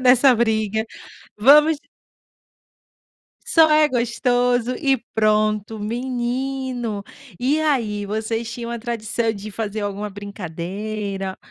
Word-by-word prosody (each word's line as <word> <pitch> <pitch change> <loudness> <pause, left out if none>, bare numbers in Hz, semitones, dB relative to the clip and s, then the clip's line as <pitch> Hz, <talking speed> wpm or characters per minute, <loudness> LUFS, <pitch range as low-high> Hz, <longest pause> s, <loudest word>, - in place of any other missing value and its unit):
nessa 255 +1 +6
briga, 220 -1 +1 0.5
vamos 300 +6 +6 1.7
Só 325 -9 +5
é 305 0 +5
gostoso 245 0 +1
e 270 -3 +2 0.2
pronto, 215 0 +1
menino, 245 0 -3 0.4
e 285 +5 +1
aí 225 -9 0
vocês 225 +2 -2
tinham 235 -1 -5
a 235 - -3
tradição 230 -1 -2
de 210 +1 -8
fazer 215 0 -4
alguma 205 0 -3
brincadeira, 200 +1 -5
230 Hz, 100 wpm, -21 LUFS, 210-255 Hz, 1.7 s, nessa